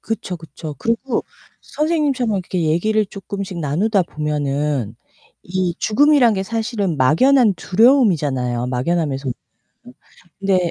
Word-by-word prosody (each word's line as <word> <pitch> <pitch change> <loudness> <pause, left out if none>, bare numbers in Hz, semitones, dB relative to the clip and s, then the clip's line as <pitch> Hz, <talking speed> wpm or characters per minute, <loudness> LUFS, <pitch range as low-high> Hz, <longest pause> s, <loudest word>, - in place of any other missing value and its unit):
그쵸, 220 -5 -4
그쵸. 155 -1 -9
그리고 230 +3 -1 0.4
선생님처럼 290 -6 0
이렇게 180 -1 -3
얘기를 210 +8 +1
쪼끔씩 195 -2 -6
나누다 185 +7 +1
보면은 145 -6 -2 0.5
이 180 -1 -2
죽음이란 260 -1 +4
게 190 - -1
사실은 220 -5 -2
막연한 210 - +4
두려움이잖아요. 160 - +2
막연함에서는. 135 0 -1 1.1
근데 185 -3 +1
185 Hz, 305 characters per minute, -19 LUFS, 150-225 Hz, 1.1 s, 죽음이란